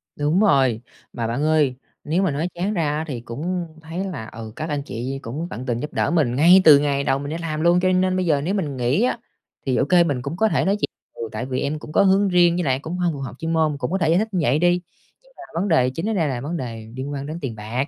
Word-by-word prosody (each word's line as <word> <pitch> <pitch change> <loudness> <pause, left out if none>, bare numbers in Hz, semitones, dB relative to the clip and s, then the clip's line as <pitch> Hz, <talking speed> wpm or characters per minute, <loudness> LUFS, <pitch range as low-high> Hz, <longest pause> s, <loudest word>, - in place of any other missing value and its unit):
Đúng 150 +5 +1
rồi. 135 - +3 0.3
Mà 115 -2 -2
bạn 120 +6 -2
ơi, 155 -4 +2 0.3
nếu 175 +6 0
mà 180 - +1
nói 150 +5 -1
chán 190 +5 -1
ra 150 -5 0
á 155 - -2
thì 125 -6 -5
cũng 170 +9 -4
thấy 165 +4 -5
là, 145 - -6
ừ, 110 -1 -9
các 155 +1 -4
anh 145 -2 -1
chị 125 +5 -4
cũng 145 +9 -5
tận 120 +4 -6
tình 120 -2 -1
giúp 150 - -6
đỡ - - 0
mình 140 -8 +2
ngay 175 +6 +7
từ 150 -4 +8
ngày 140 -1 0
đầu 135 0 +1
mình 145 +1 -5
đi 165 - -3
làm 155 -2 -3
luôn, 170 +1 +4
cho 185 - +2
nên 185 0 +2
bây 185 0 0
giờ 150 -4 +2
nếu 180 +6 -1
mình 155 -10 -2
nghỉ 125 - +1
á 245 - +1 0.5
thì, 130 -2 +1
ô - - +2
kê, 175 +2 +5
mình 140 -7 -1
cũng 145 +6 -5
có 220 - +3
thể - - +1
nói 195 +1 +2
chuyện: 205 - -2 0.3
"Ừ, 115 - -6
tại 110 +3 -4
vì 130 0 -2
em 150 +2 -2
cũng 150 - -10
có 200 - +4
hướng 195 +1 +4
riêng, 175 -1 +4
với 180 - 0
lại 130 -3 +1
cũng 165 +4 -5
hông 175 -2 0
phù 140 - -7
hợp 135 -2 -6
chuyên 165 0 -2
môn." 155 -3 +1
Cũng 145 - -3
có 190 - +1
thể 165 -4 +1
giải 170 +3 +4
thích 220 - 0
như 185 - +1
vậy 135 +4 +2
đi. 175 +1 +3 0.4
Nhưng - - -25
mà - - -10 0.2
vấn 205 - -1
đề 130 -8 +3
chính 165 +11 -3
ở - - 0
đây 170 -7 +1
là 120 -2 -3
vấn 165 +5 -3
đề 115 -6 -6
liên 135 +2 -5
quan 140 -1 -4
đến 155 +3 -5
tiền 120 -5 -4
bạc, 115 +7 -3
155 Hz, 300 wpm, -22 LUFS, 130-175 Hz, 0.5 s, từ